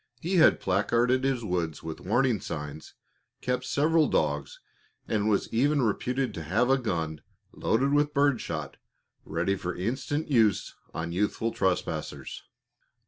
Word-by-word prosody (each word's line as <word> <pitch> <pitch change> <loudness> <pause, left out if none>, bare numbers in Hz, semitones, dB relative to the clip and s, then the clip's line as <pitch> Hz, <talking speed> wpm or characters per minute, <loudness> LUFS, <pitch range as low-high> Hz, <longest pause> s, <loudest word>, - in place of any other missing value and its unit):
He 180 +6 0
had 160 - +6
placarded 120 +7 +2
his 135 -3 0
woods 85 -6 -2
with 80 -1 -6
warning 120 +1 +1
signs, 75 -1 -6 0.4
kept 125 0 -2
several 155 +4 +3
dogs, - - -1 0.5
and 110 -1 +1
was 100 - +1
even 140 +4 +3
reputed 125 +2 0
to 80 - -5
have 110 - +1
a 135 - +4
gun 80 - -2 0.3
loaded 135 +5 +1
with 145 0 +3
bird 140 -4 +2
shot 75 -4 -5 0.5
ready 85 +5 0
for 90 -2 -4
instant 130 - -2
use 110 - +2 0.2
on 80 +1 -4
youthful 105 +5 0
trespassers. 95 -4 -2
115 Hz, 140 wpm, -28 LUFS, 90-135 Hz, 0.5 s, had